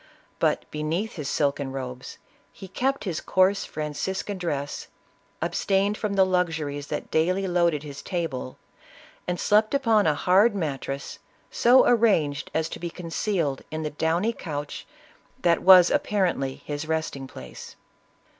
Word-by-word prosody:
But, - - +1
beneath 160 +8 -2
his 145 -3 -4
silken 140 -2 0
robes, 125 -1 -7 0.3
he 190 - -11
kept 270 +8 -1
his 180 -6 -3
coarse 190 +2 +2
Franciscan 185 +6 -4
dress, 145 -5 -3 0.6
abstained 200 +1 +1
from 210 -2 -3
the 190 -1 +5
luxuries 160 -6 -1
that - - -5
daily 185 +5 +1
loaded 170 -4 +1
his 140 -2 -8
table, 165 -9 -4 0.7
and 180 -1 -2
slept 215 +5 +3
upon 225 - +3
a 150 - +3
hard 195 +8 +4
mattress, 140 -5 -4 0.3
so 250 +2 +5
arranged 200 -12 +2
as 160 0 0
to - - -7
be 170 - -4
concealed 165 -4 -2
in 155 0 -4
the 150 - -3
downy 170 +9 0
couch 145 -7 -6 0.6
that 170 -1 +3
was 185 -2 +8
apparently 190 - 0
his 145 +1 -4
resting 155 -4 -2
place. 65 - -11
170 Hz, 135 wpm, -25 LUFS, 145-195 Hz, 0.7 s, was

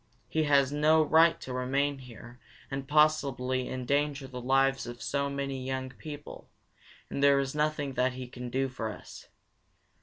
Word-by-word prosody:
He 160 -1 0
has 140 -2 +4
no 155 +2 +4
right 160 +2 +4
to 130 - -6
remain 135 +3 0
here 120 -1 -12 0.3
and 135 0 -4
possibly 140 -4 +2
endanger 140 +2 -1
the 125 -1 -7
lives 135 0 +2
of 120 0 -7
so 140 +2 -1
many 140 -1 -3
young 130 0 -3
people, 145 +2 -10 0.6
and 140 - -3
there 140 0 +6
is 135 0 -1
nothing 150 -2 -1
that 130 0 +1
he 130 0 -6
can 125 0 -7
do 135 +2 0
for 120 -4 -4
us. - - -12
135 Hz, 160 wpm, -29 LUFS, 130-145 Hz, 0.6 s, there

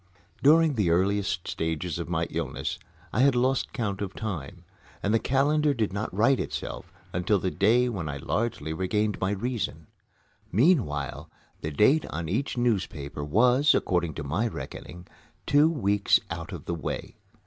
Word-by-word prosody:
During 155 +3 +5
the 105 -8 +1
earliest 95 +1 +1
stages 80 +1 -2
of 85 - -5
my 85 -1 0
illness - - -3 0.3
I - - 0
had 135 0 +5
lost 130 +2 +1
count 105 -6 -3
of 100 -1 -4
time, 95 -11 -5 0.4
and 100 - +1
the 115 - +4
calendar 145 +3 +2
did 110 -5 -1
not 100 +2 -3
right 115 +8 +3
itself - - -5 0.2
until 90 +4 +2
the 95 -1 -2
day 120 +5 +3
when 95 -10 -3
I 70 - -4
largely 100 - -2
regained 105 +5 -1
my 95 - +1
reason. 105 -6 -3 0.7
Meanwhile, 100 - +1 0.3
the 80 - -3
date 130 - +3
on 85 +1 -4
each 125 +8 -1
newspaper 90 -12 -1
was, 125 - +4
according 85 -3 0
to 80 - -4
my 85 +12 0
reckoning, 90 -5 -8 0.4
two 145 +3 +5
weeks 105 -10 +2
out 85 +2 -5
of 85 -6 -7
the - - -2
way. 80 -4 -5
100 Hz, 160 wpm, -27 LUFS, 85-125 Hz, 0.7 s, During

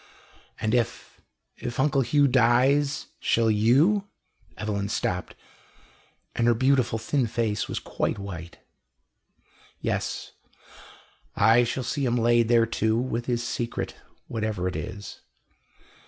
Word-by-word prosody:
"And 110 +1 -1
if 120 -2 -2 0.4
if 120 +2 -5
Uncle 140 0 +3
Hugh 140 +4 +3
dies 135 +3 +3
shall 115 -1 +2
you 140 - +3 0.2
" 85 -5 -33
Evelyn 100 -2 -2
stopped, 90 -3 -2 1.0
and 115 - +1
her 120 - +4
beautiful 130 -2 +2
thin 120 +3 0
face 110 -2 -1
was - - -4
quite - - -2
white. 85 -4 -8 1.2
"Yes. - - -3 1.0
I 115 +3 +5
shall 125 +2 -2
see 140 +3 -2
him 120 -2 +1
laid 120 0 +3
there 115 -1 +4
too 110 -1 0
with 120 -1 -2
his 120 -1 0
secret, 120 -3 -3 0.3
whatever 110 -5 -2
it 90 - -3
is." 100 0 -7
120 Hz, 125 wpm, -26 LUFS, 110-130 Hz, 1.2 s, I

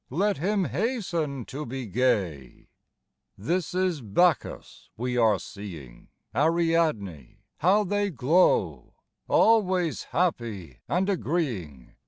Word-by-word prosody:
Let 195 +9 0
him 195 +3 +1
hasten 170 - -2
to 145 +3 -6
be 130 -1 -5
gay! 95 - -1 0.7
This 170 - -2
is 185 -5 0
Bacchus 150 - 0
we 125 +2 -2
are 110 -4 +4
seeing, 85 - -10 0.3
Ariadne 155 - 0
— - - -37
^how 195 +5 +3
they 205 +1 0
glow 160 +4 +1
I - - -43 0.3
Always 185 -7 +3
happy 115 - -2
and 185 +2 +1
agreeing. 125 - -3
150 Hz, 110 wpm, -26 LUFS, -, 0.7 s, are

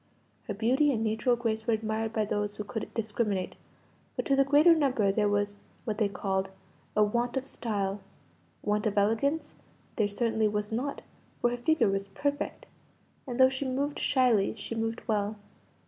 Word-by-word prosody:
Her 205 - -3
beauty 255 +7 +3
and 225 -4 0
natural 220 +3 +2
grace 225 -1 -2
were 230 - +4
admired 220 0 -2
by 220 -1 0
those 205 0 -2
who 210 - -4
could 220 +1 -5
discriminate; 210 -4 -1 0.6
but - - -2
to 275 - +3
the 275 - +5
greater 295 +5 +6
number 260 -10 +2
there 210 +1 +2
was 205 0 0 0.3
(what 215 -1 -2
they 210 -2 +2
called) 190 -1 -1 0.5
"a 210 - +5
want 240 +4 0
of 265 - -2
style" 200 -6 -2 0.6
want 210 +1 +1
of 205 - -2
elegance 280 +9 +1 0.4
there 210 -3 +2
certainly 220 +1 +1
was 210 0 -2
not, 260 +6 -3 0.4
for 240 - +2
her 245 - -2
figure 315 +3 +3
was 195 0 -1
perfect, 285 +8 -3 0.6
and 245 -1 -4
though 260 - +9
she 265 +1 -3
moved 275 +2 -1
shyly, 245 -7 +3
she 215 - -6
moved 225 0 -2
well. 210 -1 0
220 Hz, 175 wpm, -29 LUFS, 205-255 Hz, 0.6 s, though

